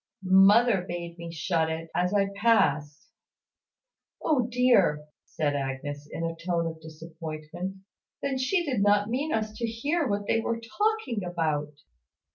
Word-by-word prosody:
"Mother 195 +3 +6
bade 170 0 -6
me 170 0 -6
shut 165 0 0
it, 160 0 -5
as 180 +1 +1
I 200 -1 +2
passed." 160 -9 +1 1.1
"O 260 -7 +1
dear!" 235 -12 +3 0.2
said 145 -2 -1
Agnes, 145 +1 -4
in 165 - -4
a 165 0 -2
tone 170 0 -1
of 160 -1 -5
disappointment; 160 +3 -7 0.4
"then 270 -2 -2
she 345 +7 +1
did 255 -9 0
not 205 +1 +3
mean 285 +6 -1
us 215 -1 -1
to 235 - -1
hear 285 +8 -1
what 205 -1 -1
they 225 - +2
were 230 0 -2
talking 340 - -1
about." 155 -4 -1
185 Hz, 145 wpm, -27 LUFS, 160-230 Hz, 1.1 s, Mother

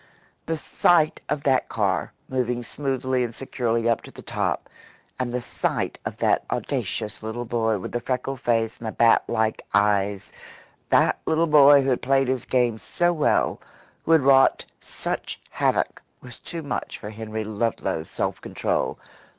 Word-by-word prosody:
The 165 0 -1
sight 155 +1 +2
of 150 -1 -1
that 130 -2 +2
car, 100 -6 0 0.2
moving 125 -2 -1
smoothly 130 -1 -1
and 115 -1 -4
securely 115 -3 -1
up 115 -1 +2
to - - -12
the - - -12
top, - - -2 0.5
and 125 -1 -1
the 125 0 -3
sight - - -2
of - - -4
that - - +2
audacious 105 -1 -3
little 110 +2 -4
boy 110 -2 0
with 90 - -6
the 120 - -2
freckled 130 +1 -3
face 115 -1 0
and 115 - -6
the - - -2
bat 115 +1 +4
like 110 0 0
eyes, 100 -1 +1 0.6
that - - +3
little 160 +1 +3
boy 145 -2 +7
who 135 - +1
had 125 - 0
played 135 0 +2
his 130 -2 -1
game 120 -3 +1
so 175 +8 0
well, 155 -3 +1 0.4
who - - 0
had 160 - +6
wrought 135 0 +5
such - - -5
havoc, - - 0 0.2
was 125 -1 -11
too 165 -1 -6
much 145 - -4
for 105 - -8
Henry 110 0 -5
Ludlow's 110 +2 -2
self - - -3
control. - - -2
120 Hz, 165 wpm, -24 LUFS, 110-135 Hz, 0.6 s, boy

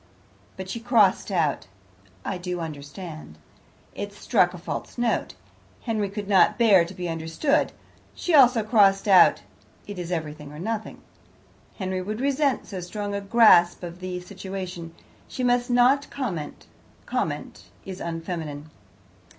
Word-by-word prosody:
But 190 0 -6
she 210 +5 -4
crossed 225 -6 +3
out 160 - 0 0.6
"I 180 - -3
do 180 0 -4
understand"; 155 - -8 0.6
it 205 0 -5
struck 200 -3 +2
a 180 - -9
false 175 - -6
note. 240 -1 -1 0.5
Henry 215 -4 -1
could 205 0 -6
not 195 -2 +4
bear 205 -7 +5
to 180 +3 -10
be 180 -1 -4
understood. 165 - 0 0.4
She 355 - -2
also 250 -6 +6
crossed 205 -3 +4
out, 190 -2 +6 0.4
"It 205 -2 -7
is 175 0 -5
everything 150 -3 -5
or 150 - -10
nothing. 220 +5 -5 0.7
"Henry 185 -2 -2
would 215 +4 -4
resent 280 0 +1
so 190 - -6
strong 205 +3 -5
a 200 - -2
grasp 200 -5 +5
of 175 0 -7
the 185 -1 -4
situation. 185 -3 -7 0.3
She 255 - -5
must 245 0 +2
not 250 +4 +3
comment; 185 - -5 0.4
comment - - -4 0.2
is 190 -1 -7
unfeminine. 165 -3 -5
190 Hz, 140 wpm, -25 LUFS, 170-225 Hz, 0.7 s, also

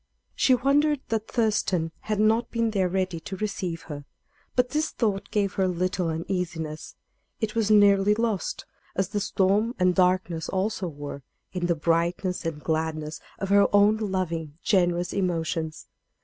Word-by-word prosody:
She 260 - +4
wondered 285 +3 +2
that 225 -1 -1
Thurston 205 -7 0
had 215 -1 -2
not 220 +2 +3
been 230 -1 0
there 190 -3 +1
ready 185 -2 -1
to 190 +4 -7
receive 185 -5 -3
her; 145 -2 -7 0.5
but 250 0 +3
this 305 +1 0
thought 205 -4 -1
gave 205 -2 0
her 190 -1 +1
little 180 -1 -1
uneasiness; 165 -2 -4 0.4
it 220 -2 -2
was 225 -2 +1
nearly 205 -1 +5
lost, 225 -4 -2 0.3
as 190 -1 0
the 205 - -1
storm 200 +4 +1
and 180 0 +3
darkness 180 -3 +1
also 190 0 -1
were, 145 -2 -7 0.3
in 180 -2 -1
the 170 - +2
brightness 170 +3 0
and 150 -2 -5
gladness 155 -1 -2 0.2
of 195 - -4
her 200 0 +6
own 205 +1 +5
loving, 175 -7 -3
generous 175 -3 +2
emotions. 165 -4 -2
185 Hz, 150 wpm, -26 LUFS, 170-210 Hz, 0.5 s, her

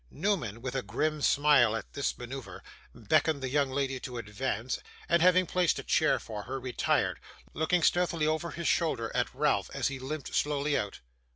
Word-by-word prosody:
Newman, 125 - -2
with 125 - -3
a 135 - -1
grim 155 +2 -1
smile 140 -7 +4
at 110 - -6
this 140 - -2
manoeuvre, 125 +1 -8 0.3
beckoned 155 -3 +2
the 130 - -1
young 140 0 +2
lady 135 -1 -1
to 125 -1 -6
advance, 115 +2 -3 0.3
and 170 -1 +3
having 185 +1 +5
placed 180 0 +1
a - - -5
chair - - +3
for 105 -2 -6
her, 135 +3 -4
retired; 125 -1 0 0.3
looking 160 +2 +1
stealthily 175 -3 +2
over 155 +2 0
his 170 +2 -4
shoulder 130 -10 +1
at 125 -1 0
Ralph 135 -8 +1
as 140 -1 +1
he 140 -1 -6
limped 140 +2 -5
slowly 145 0 +1
out. 100 - -3
140 Hz, 180 wpm, -30 LUFS, 125-155 Hz, 0.3 s, having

